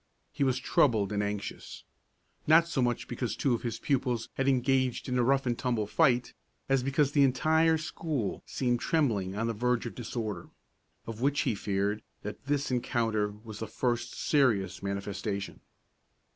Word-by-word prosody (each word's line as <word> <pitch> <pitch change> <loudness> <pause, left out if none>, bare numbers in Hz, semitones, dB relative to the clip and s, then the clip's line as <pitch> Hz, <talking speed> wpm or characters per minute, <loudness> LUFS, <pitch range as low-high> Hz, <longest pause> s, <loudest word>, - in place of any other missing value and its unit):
He - - -1
was 130 -2 +2
troubled 110 -5 +2
and 105 0 0
anxious, 105 -1 -5 0.6
not 160 +2 +6
so 155 -5 -1
much 120 -1 0
because 120 -1 -3
two 135 - +1
of 115 - -1
his 120 -2 -3
pupils 125 -4 -1
had 135 - -1
engaged 130 -1 +1
in 125 - -1
a 125 - +3
rough 135 +2 +2
and 120 -1 +1
tumble 120 -3 -1
fight, 125 +1 +2 0.3
as 135 -1 +3
because 140 +2 +1
the 145 - +3
entire 160 +5 +4
school 155 - -3
seemed 120 -2 0
trembling 110 - 0
on 110 +2 -1
the 115 - -1
verge 125 +2 0
of 120 - -5
disorder, 110 -6 -5 0.6
of 115 0 -7
which 140 +2 +2
he 125 - +1
feared 100 +1 -1 0.2
that 105 +3 -7
this 145 -1 0
encounter 115 -4 0 0.2
was 110 -3 -8
the 110 - -4
first 120 +2 -2
serious 115 -10 +1
manifestation. 100 0 -4
120 Hz, 165 wpm, -30 LUFS, 110-135 Hz, 0.6 s, not